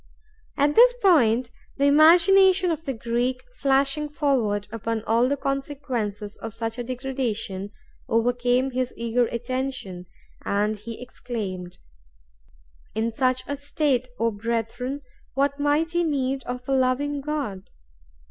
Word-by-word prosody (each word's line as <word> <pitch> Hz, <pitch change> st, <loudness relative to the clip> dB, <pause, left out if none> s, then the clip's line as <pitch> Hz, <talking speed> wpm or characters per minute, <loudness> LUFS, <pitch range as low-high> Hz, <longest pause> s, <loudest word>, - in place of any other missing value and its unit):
At 290 Hz, +1 st, +3 dB
this -, -, +7 dB
point, 255 Hz, -, +4 dB, 0.3 s
the 280 Hz, -, +2 dB
imagination 360 Hz, +5 st, +6 dB
of 320 Hz, 0 st, -4 dB
the 270 Hz, -, -2 dB
Greek, 240 Hz, +3 st, -1 dB
flashing 275 Hz, -, +1 dB
forward 250 Hz, -9 st, 0 dB
upon 225 Hz, 0 st, -3 dB
all 230 Hz, +3 st, +2 dB
the 285 Hz, -, 0 dB
consequences 260 Hz, -7 st, -3 dB
of 225 Hz, -1 st, -7 dB
such 225 Hz, +1 st, -4 dB
a -, -, -2 dB
degradation, 240 Hz, -6 st, -3 dB, 0.4 s
overcame 245 Hz, +3 st, +1 dB
his 255 Hz, 0 st, -2 dB
eager 235 Hz, +1 st, +1 dB
attention, 240 Hz, -7 st, -4 dB, 0.4 s
and 210 Hz, +2 st, 0 dB
he 225 Hz, +2 st, -8 dB
exclaimed, 195 Hz, -8 st, -6 dB, 1.2 s
"In 225 Hz, +1 st, 0 dB
such 255 Hz, +2 st, 0 dB
a 285 Hz, -, -3 dB
state, 285 Hz, -3 st, 0 dB
O 230 Hz, 0 st, +1 dB
brethren, 235 Hz, +5 st, -3 dB, 0.3 s
what 280 Hz, +1 st, +1 dB
mighty 325 Hz, +4 st, +1 dB
need 270 Hz, -4 st, -1 dB
of 250 Hz, 0 st, -6 dB
a 275 Hz, -, +1 dB
loving 270 Hz, +2 st, +1 dB
God!" 270 Hz, -10 st, -4 dB
255 Hz, 125 wpm, -24 LUFS, 230-285 Hz, 1.2 s, this